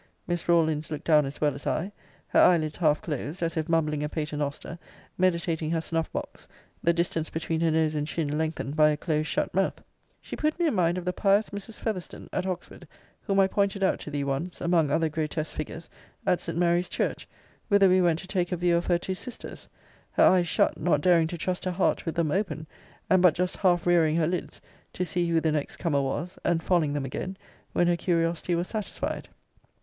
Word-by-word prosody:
Miss 175 0 -3
Rawlins 160 -3 +2
looked 150 -2 -5
down 150 -3 +4
as 140 - -7
well 150 -2 +2
as 140 - -8
I; 185 +6 -1 0.4
her - - +3
eyelids 160 -4 +4
half 155 -3 +2
closed, 155 +3 -4
as 165 0 -1
if 160 0 -2
mumbling 155 -3 +1
a 150 - -2
pater 150 -1 -3
noster, 145 +3 -4 0.4
meditating 170 -3 0
her 165 0 +1
snuff 165 0 -2
box, - - -6 0.4
the 170 - +4
distance 170 -2 -1
between 160 0 -2
her 165 - +3
nose 160 -1 +2
and 150 -1 -2
chin 150 -3 -2
lengthened 155 -2 -2
by 155 -1 +6
a 150 - 0
close 155 -1 -1
shut - - -1
mouth. 195 +1 0 0.4
She - - -7
put 305 +1 0
me 345 - +2
in 310 - +2
mind 175 -3 +2
of 180 - -5
the 180 - 0
pious 200 +2 +2
Mrs. 205 +2 -8
Fetherstone 200 -6 -5
at 185 - -1
Oxford, 180 -2 -6 0.3
whom 195 -2 0
I 195 - +6
pointed 200 0 0
out 190 - +2
to - - -7
thee 145 -1 -2
once, 140 +6 -3
among 170 -3 +2
other 160 +3 +2
grotesque 155 0 -3
figures, 160 +2 -6 0.4
at 180 - +2
St. 165 -1 -5
Mary's 175 +1 +2
church, - - -2 0.4
whither 200 -1 +5
we 185 0 +4
went 170 -3 +3
to 185 - -8
take 180 -2 -1
a 180 - 0
view 175 0 +2
of 170 - -2
her 175 - +3
two 185 +2 -4
sisters: 240 +6 -9 0.4
her - - +4
eyes 180 -2 +5
shut, - - +1
not 150 -5 +2
daring 170 -2 +4
to 175 - -5
trust 180 +3 -2
her - - +1
heart 180 -1 0
with 165 - -2
them 165 -3 +1
open; 160 -4 -1 0.4
and 185 -1 +4
but 180 -4 +5
just 180 +1 -1
half 175 -3 +2
rearing 165 -3 +4
her 165 -1 +2
lids, 175 +2 -3 0.3
to 180 - -2
see 175 +1 0
who 165 -1 +3
the 160 -1 +1
next 150 -2 -2
comer 145 -5 +1
was; 150 +7 -3
and 165 -1 +1
falling 165 -6 +2
them 145 -2 -2
again, 185 +8 -5 0.4
when 175 - +3
her 175 0 +3
curiosity 170 0 0
was 175 +2 -1
satisfied. 215 -3 -4
170 Hz, 215 wpm, -27 LUFS, 155-180 Hz, 0.4 s, by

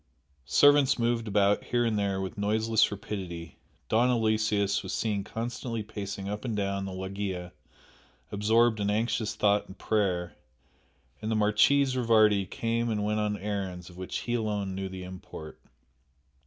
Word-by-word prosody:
Servants 145 - +5
moved 115 -1 0
about 100 0 +2
here 120 -1 +1
and 115 -2 +1
there 100 -2 0
with 95 -1 -4
noiseless 110 +2 +2
rapidity, 90 -5 -6 0.3
Don 120 +3 +3
Aloysius 110 -3 +1
was - - -6
seen 105 -3 -1
constantly 115 +1 -4
pacing 100 -2 -6
up 105 +1 -4
and 115 -5 -2
down 100 -1 -1
the 95 - -5
loggia 95 -1 -4 0.8
absorbed 110 +2 +3
in 100 0 0
anxious 110 +1 0
thought 105 0 +2
and 95 - -12
prayer, 95 -5 0 0.9
and 110 - -3
the 110 - +1
Marchese 125 +6 +3
Rivardi 110 -5 +4
came 115 +1 -1
and 105 -2 -1
went 105 +1 0
on 105 -1 0
errands 95 -3 -4
of 90 - -15
which 95 0 -4
he 120 - -3
alone 105 -4 -1
knew 95 0 -4
the 95 0 -7
import. 90 -4 -10
105 Hz, 155 wpm, -28 LUFS, 100-115 Hz, 0.9 s, Servants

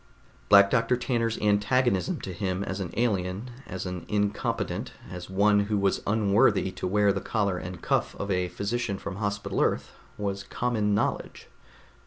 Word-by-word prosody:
Black 100 -1 +7
Doctor 125 0 +2
Tanner's 115 -2 0
antagonism 105 -1 +2
to 95 - -5
him 95 +1 -2
as 95 0 -4
an 95 -3 -3
alien, 105 0 -1 0.2
as 95 0 -5
an 90 -2 -5
incompetent, 105 -1 -1 0.2
as 90 0 -7
one 105 +2 +4
who 105 0 0
was 100 -1 +1
unworthy 100 -2 +3
to 90 - -4
wear 100 +1 +3
the 100 - -3
collar 100 -5 0
and 90 -1 -8
cuff - - 0
of 100 0 -3
a 90 -1 +1
physician 100 +3 -2
from 95 - -6
Hospital 100 -1 -2
Earth, - - 0 0.3
was 100 -1 -2
common 110 -4 0
knowledge. - - -2
100 Hz, 160 wpm, -27 LUFS, 95-105 Hz, 0.3 s, Black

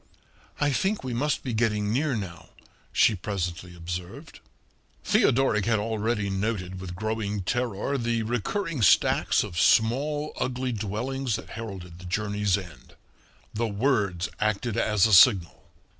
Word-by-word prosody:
"I 145 -1 +2
think 195 +7 0
we 130 -2 -4
must 145 +4 -1
be 125 - -3
getting 105 -2 0
near 140 +1 +1
now," 95 -6 -7 0.4
she 115 - +4
presently 90 -2 -4
observed. 85 +1 -7 0.6
Theodoric 115 -5 +3
had 115 -1 +3
already 110 0 -1
noted 95 -2 -2
with 90 -2 -7
growing 105 -1 -2
terror 120 +4 -1
the 115 -1 0
recurring 130 - -2
stacks 95 - +4
of 85 - -5
small, 145 +7 +2
ugly 130 0 -2
dwellings 115 +4 -2
that - - -7
heralded 95 -6 -8
the 90 - -11
journey's 105 +1 0
end. 85 -9 -11 0.6
The 115 +2 -1
words 100 -5 0
acted 110 +1 0
as 105 -4 +3
a 110 - +2
signal. 95 - +5
110 Hz, 135 wpm, -26 LUFS, 95-120 Hz, 0.6 s, signal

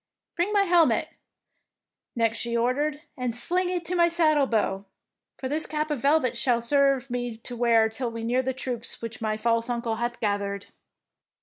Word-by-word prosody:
Bring 355 +4 0
my 405 -1 +4
helmet,'^ 345 -3 +3 1.1
next 230 -1 +1
she 235 0 -1
or 240 +2 +2
dered, 295 +2 -2
" - - -45
and 245 -2 -2
sling 355 +9 +1
it 355 -2 -2
to 360 - -2
my 340 -1 +5
saddle 310 -4 +3
bow, 205 -4 0 0.5
for 260 - -4
this 305 +4 -2
cap 305 0 -2
of 295 - -1
velvet 280 -1 +2
shall 245 -3 +2
serve 275 +1 +2
me 245 -2 -3
to 240 +2 -7
wear 230 -2 +4
till 235 +2 -4
we 230 0 -6
near 245 +3 +1
the 260 0 -1
troops 250 -3 -5
which 230 -1 -6
my 215 -1 -1
false 230 +1 0
uncle 235 -2 -2
hath 240 +1 -3
gathered. 200 -2 -2
245 Hz, 190 wpm, -26 LUFS, 230-300 Hz, 1.1 s, my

